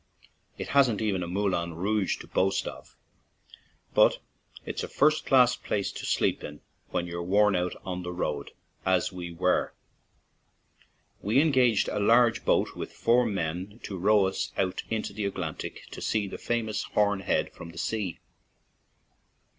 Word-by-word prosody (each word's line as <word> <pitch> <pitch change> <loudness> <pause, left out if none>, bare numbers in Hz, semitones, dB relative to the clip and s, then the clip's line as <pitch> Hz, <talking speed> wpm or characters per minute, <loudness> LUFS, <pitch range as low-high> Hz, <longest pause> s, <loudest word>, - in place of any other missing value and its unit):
It - - -5
hasn't 130 -7 +4
even 105 -4 0
a 85 - -3
Moulin 90 -3 -1
Rouge 100 +3 0
to - - -12
boast 95 0 +1
of, - - -9 1.0
but - - +5 0.5
it's - - -4
a - - -3
first 155 +2 +2
class 125 -2 +5
place 105 -5 -2
to - - -6
sleep - - +1
in 75 0 -8 0.3
when 85 - -1
you're 85 0 -5
worn 100 +3 +3
out 90 0 -1
on 90 -1 -3
the 90 0 -5
road, 75 -5 -3 0.3
as 95 0 +2
we 90 -2 -6
were. 90 +2 0 1.5
We 110 +7 +2
engaged 130 -8 +3
a 105 - -2
large 115 +2 +4
boat - - +2
with - - -6
four 120 +1 +3
men 95 +2 -3
to 100 - -5
row 100 +2 +4
us 95 - -2
out 95 -1 0
into 110 -2 -2
the 105 0 -3
Atlantic 90 -5 -4
to - - -8
see 105 -2 0
the - - -7
famous 115 -2 -1
Horn 105 -1 +1
Head 95 - 0
from 85 - -10
the - - -13
sea. 105 -7 -2
100 Hz, 160 wpm, -28 LUFS, 90-110 Hz, 1.5 s, but